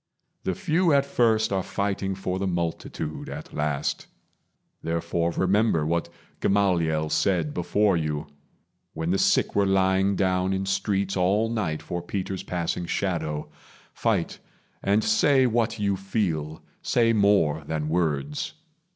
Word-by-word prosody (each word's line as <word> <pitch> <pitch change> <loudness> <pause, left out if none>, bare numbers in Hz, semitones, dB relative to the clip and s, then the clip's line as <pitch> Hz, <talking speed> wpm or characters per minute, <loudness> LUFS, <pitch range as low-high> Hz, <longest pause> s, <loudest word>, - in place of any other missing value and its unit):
The 95 - 0
few 170 - +2
at 140 -1 +4
first 110 -6 +2
Are 95 - +1
fighting 100 0 -2
for 95 -1 -3
the 95 - -1
multitude 85 -3 -3
at - - -8
last; 75 -1 -2 0.7
Therefore 85 +1 -1
remember 95 -2 +2
what 85 +2 -1 0.3
Gamaliel 85 -6 +1
said 80 -1 +1
Before 100 +3 +2
you, 75 -2 -2 0.7
when 80 +2 -1
the 95 - +1
sick - - +2
were 100 -1 +3
lying 95 +1 +2
down 95 0 +1
In 95 0 -1
streets 95 0 0
all 100 +5 +2
night 90 -9 -2
for 90 0 -4
Peter's 95 +1 -4
passing 85 0 -3
shadow. 80 -6 -2 0.4
Fight, - - -1 0.4
and 100 +2 +2
say 145 -12 +4
what 115 -1 +1
you 100 -2 +1
feel; 90 -6 -2 0.2
say 115 -1 +2
more 100 -8 +3
than 75 -1 -2
words. 85 - -1
95 Hz, 135 wpm, -25 LUFS, 80-100 Hz, 0.7 s, at